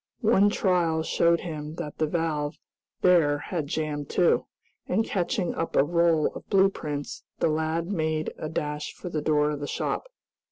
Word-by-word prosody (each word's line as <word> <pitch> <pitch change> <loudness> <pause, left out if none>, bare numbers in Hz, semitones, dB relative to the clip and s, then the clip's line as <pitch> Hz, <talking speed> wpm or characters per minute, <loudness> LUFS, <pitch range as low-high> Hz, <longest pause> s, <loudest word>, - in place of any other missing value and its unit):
One 205 -2 +5
trial 175 -6 +1
showed 170 +1 +2
him 155 -2 -6
that 160 -4 -6
the 155 - +2
valve 150 -3 -1 0.4
there 165 -5 +4
had 155 0 -4
jammed 150 -1 -3
too, 175 - +2 0.4
and 220 +5 +1
catching 190 0 -1
up 165 - -3
a - - +6
roll 170 0 +2
of - - -10
blue 195 0 +5
prints 145 -5 -5 0.2
the - - +2
lad 160 +2 0
made 155 -4 -1
a 155 - -4
dash 150 -1 -3
for 180 - -7
the 155 -3 -2
door 150 0 +2
of 145 - -4
the 145 - -4
shop. - - -2
160 Hz, 170 wpm, -26 LUFS, 150-175 Hz, 0.4 s, a